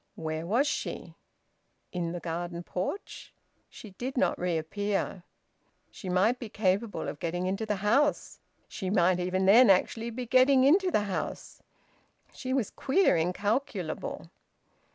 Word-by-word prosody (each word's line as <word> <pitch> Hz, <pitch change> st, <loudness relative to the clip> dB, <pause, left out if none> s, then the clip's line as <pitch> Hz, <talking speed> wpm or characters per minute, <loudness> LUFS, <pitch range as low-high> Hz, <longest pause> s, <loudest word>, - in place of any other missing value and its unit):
Where 160 Hz, 0 st, -4 dB
was 240 Hz, +9 st, +2 dB
she? 295 Hz, -, -4 dB, 0.8 s
In 175 Hz, -2 st, -3 dB
the 175 Hz, -, -4 dB
garden 170 Hz, +1 st, -4 dB
porch? 185 Hz, -, -5 dB, 0.3 s
She 215 Hz, -, -12 dB
did 255 Hz, +8 st, -6 dB
not -, -, +1 dB
reappear. 180 Hz, +3 st, -2 dB, 0.7 s
She 190 Hz, -, -8 dB
might 200 Hz, +7 st, +2 dB
be 230 Hz, -, -7 dB
capable 205 Hz, +2 st, -1 dB
of 145 Hz, -, -6 dB
getting 175 Hz, +2 st, -2 dB
into 195 Hz, +4 st, -2 dB
the 210 Hz, -, 0 dB
house! 280 Hz, +7 st, +1 dB, 0.3 s
She 190 Hz, -, -5 dB
might 185 Hz, -2 st, +3 dB
even 185 Hz, +1 st, 0 dB
then 230 Hz, +5 st, +7 dB
actually 225 Hz, +4 st, +2 dB
be 245 Hz, +2 st, -5 dB
getting 255 Hz, +2 st, +5 dB
into 365 Hz, +7 st, +4 dB
the 215 Hz, -, +2 dB
house! 195 Hz, -3 st, -5 dB, 0.7 s
She 260 Hz, -2 st, -6 dB
was 260 Hz, -6 st, 0 dB
queer, 345 Hz, -, +2 dB
incalculable. 200 Hz, +10 st, -2 dB
200 Hz, 135 wpm, -29 LUFS, 180-250 Hz, 0.8 s, then